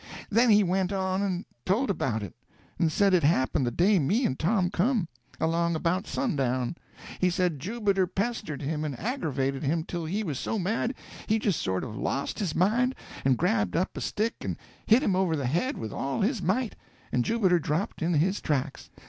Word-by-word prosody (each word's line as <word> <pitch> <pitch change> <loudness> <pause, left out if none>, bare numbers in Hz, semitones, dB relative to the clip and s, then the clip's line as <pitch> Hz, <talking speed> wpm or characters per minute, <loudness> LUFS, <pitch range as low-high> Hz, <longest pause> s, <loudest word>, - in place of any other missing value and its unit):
Then 230 +3 +4
he 210 -1 +6
went 185 +1 0
on 190 -1 0
and 185 -3 -1 0.2
told 215 +6 +1
about 115 - -1
it, 95 - -7 0.5
and 165 -2 +2
said 195 +4 +3
it 180 - +5
happened 140 -3 +2
the - - 0
day 190 - +3
me 200 - +2
and 130 - -1
Tom 180 +1 +2
come—along 170 - 0
about 170 +4 0
sundown. 130 - -1 0.4
He 185 - +3
said 180 -4 0
Jubiter 200 - 0
pestered 195 - -3
him 150 +2 -2
and 145 -5 -4
aggravated 140 - -1
him 160 +2 0
till 170 0 -4
he 200 +7 -1
was 150 -9 -3
so 225 - -2
mad 225 +6 -1 0.3
he 220 - +3
just 205 -5 0
sort 95 0 -1
of 110 -5 -6
lost 135 - -2
his 185 -7 -1
mind 240 +8 +2 0.3
and 130 -2 +3
grabbed 105 -5 +1
up 185 - 0
a - - -5
stick 225 +3 -1
and - - -3 0.3
hit 235 +6 +5
him 195 - +2
over 185 -3 +2
the 140 -3 -2
head 175 - 0
with 110 - -5
all 135 0 -2
his 220 +1 +1
might, 215 +6 0 0.4
and 125 - +2
Jubiter 190 - +3
dropped 165 +7 -2
in 165 +1 +1
his 185 +7 +1
tracks. 140 -2 -2
180 Hz, 190 wpm, -28 LUFS, 145-205 Hz, 0.5 s, he